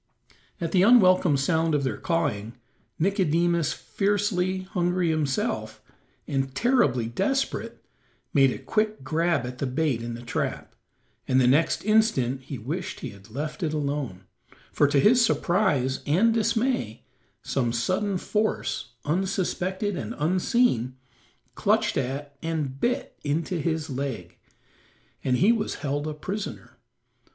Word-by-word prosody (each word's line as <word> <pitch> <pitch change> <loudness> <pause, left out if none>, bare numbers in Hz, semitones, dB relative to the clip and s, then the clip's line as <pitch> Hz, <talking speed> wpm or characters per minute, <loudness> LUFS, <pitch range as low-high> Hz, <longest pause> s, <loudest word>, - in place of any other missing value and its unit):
At 165 -2 -2
the 180 - +4
unwelcome 185 - +6
sound 160 +2 +1
of 145 - 0
their 130 - -2
cawing, 145 - -1 0.4
Nicodemus, 170 -3 +2
fiercely 195 -2 0
hungry 180 -2 0
himself, 150 -4 -1 0.5
and 135 -1 -2
terribly 240 - +2
desperate, 270 - -2 0.5
made 135 -1 +5
a - - -4
quick 215 -7 -1
grab 160 -1 +1
at 125 0 -7
the 140 - -1
bait 130 -2 0
in 115 0 -5
the 120 - -9
trap, 120 - -3 0.5
and 130 0 +3
the 130 - +4
next 145 +10 +2
instant 205 - +2
he 135 +1 -7
wished 170 - -5
he - - -5
had 100 0 -16
left 150 - -5
it 155 -3 -1
alone, 140 -10 -3 0.5
for 145 - +3
to 145 0 +2
his 235 - +5
surprise 175 - +1
and 200 +10 +4
dismay 225 - 0 0.4
some 120 -4 0
sudden 185 - 0
force, 210 - -2
unsuspected 190 +3 -1
and - - -5
unseen, 160 - +1 0.6
clutched - - +1
at, 140 +3 -3
and 155 -5 -3
bit 250 - -1
into 160 +4 -1
his 160 0 -1
leg, 130 - -5 0.8
and 125 -1 +2
he 200 - +5
was 225 -3 -1
held 145 +1 -2
a 155 - -4
prisoner. 195 +7 -6
160 Hz, 130 wpm, -26 LUFS, 135-190 Hz, 0.8 s, unwelcome